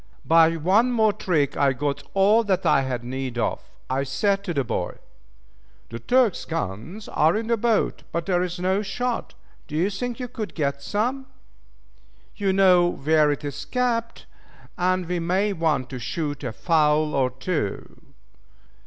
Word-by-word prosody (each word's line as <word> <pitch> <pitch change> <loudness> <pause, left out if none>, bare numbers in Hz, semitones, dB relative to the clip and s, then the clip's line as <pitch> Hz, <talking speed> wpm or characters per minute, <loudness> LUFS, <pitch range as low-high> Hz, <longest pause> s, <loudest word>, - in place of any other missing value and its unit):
By 165 0 +5
one 200 +10 +3
more 220 -3 +3
trick 150 -9 0
I 140 -1 +3
got 140 +2 -2
all 205 +4 +5
that 190 -3 0
I - - +4
had 125 -3 -3
need 130 0 -4
of. - - -1 0.3
I 130 +1 0
said 195 +10 0
to 180 - -2
the 140 -5 0
boy, 90 -6 -3 0.9
"the 115 - -6
Turk's 245 - +2
guns 165 - -5
are 160 +6 +2
in 225 - -3
the 235 +1 +2
boat, 230 0 0
but 170 0 -2
there 180 -2 +1
is 180 0 -3
no 190 +3 +1
shot. 240 +4 -3 0.3
Do 150 - -7
you 180 +6 +1
think 240 +5 -4
you 250 - -4
could 225 -3 -6
get 140 -3 -1
some? 245 - -2 1.1
You 200 -2 0
know 185 -2 +5
where 150 -1 +2
it 145 +1 -4
is 145 - -5
kept, 235 -2 -2 0.5
and 185 0 0
we 180 +1 -2
may 190 +5 0
want 155 -7 0
to 130 - -5
shoot 145 +3 -4
a 125 - -3
fowl 155 +2 +2
or 130 -2 +2
two." 130 - -4
170 Hz, 165 wpm, -24 LUFS, 140-205 Hz, 1.1 s, By